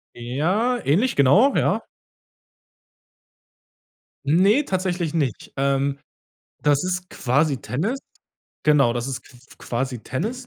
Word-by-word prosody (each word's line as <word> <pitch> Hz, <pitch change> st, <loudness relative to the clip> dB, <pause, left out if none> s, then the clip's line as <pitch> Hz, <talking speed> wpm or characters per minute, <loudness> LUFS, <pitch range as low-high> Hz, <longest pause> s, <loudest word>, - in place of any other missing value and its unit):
Ja, 170 Hz, -, 0 dB
ähnlich, 205 Hz, -, +2 dB
genau, 190 Hz, -, +5 dB
ja. -, -, +1 dB, 2.4 s
Ne, 195 Hz, -, +4 dB
tatsächlich 180 Hz, -, -2 dB
nicht, 140 Hz, -8 st, -2 dB
ähm, 140 Hz, 0 st, 0 dB, 0.6 s
das 145 Hz, +2 st, +2 dB
ist 180 Hz, 0 st, -3 dB
quasi 140 Hz, +3 st, +1 dB
Tennis, 175 Hz, -, -2 dB, 0.6 s
genau, 140 Hz, -6 st, +4 dB
das 120 Hz, +2 st, -3 dB
ist 130 Hz, -, -5 dB
q 125 Hz, -, -17 dB, 0.2 s
quasi 125 Hz, +1 st, -3 dB
Tennis, 235 Hz, -, -4 dB
150 Hz, 105 wpm, -23 LUFS, 135-190 Hz, 2.4 s, genau